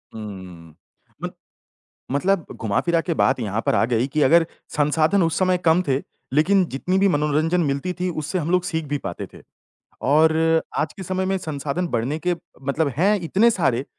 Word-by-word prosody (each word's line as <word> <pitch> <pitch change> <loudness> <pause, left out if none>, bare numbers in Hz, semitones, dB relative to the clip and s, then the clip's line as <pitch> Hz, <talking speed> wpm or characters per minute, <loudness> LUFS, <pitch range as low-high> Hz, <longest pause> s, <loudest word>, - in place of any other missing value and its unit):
हुँ, 95 -7 -9 0.5
मत - - -5 0.8
मतलब 175 +5 +1
घुमा-फिरा 140 - 0
के 170 0 -2
बात 130 -3 +2
यहाँ 110 0 -2
पर - - +2
आ - - +3
गई 115 +2 +2
की 150 +2 -1
अगर 165 +4 +5 0.3
संसाधन 155 +6 +2
उस 165 -1 +1
समय 185 -1 +2
कम 175 0 +3
थे, 130 - +3 0.4
लेकिन 185 +7 +4
जितनी 180 +7 0
भी 200 +1 +4
मनोरंजन 155 +2 +1
मिलती 145 +4 -1
थी 180 - 0
उससे 155 +2 -3
हम 165 -1 -2
लोग 180 0 +3
सीख 160 -3 -2
भी 145 - +1
पाते - - -6
थे। - - -13 0.7
और 160 +2 +4 0.4
आज 155 - -1
के 195 - -9
समय 185 +1 -2
में 190 0 0
संसाधन 155 +1 -3
बढ़ने 125 +4 -1
के 180 - +3 0.3
मतलब 140 +3 0
हैं 195 +7 +3
इतने 195 +7 +3
सारे 135 - 0
160 Hz, 180 wpm, -22 LUFS, 140-180 Hz, 0.8 s, अगर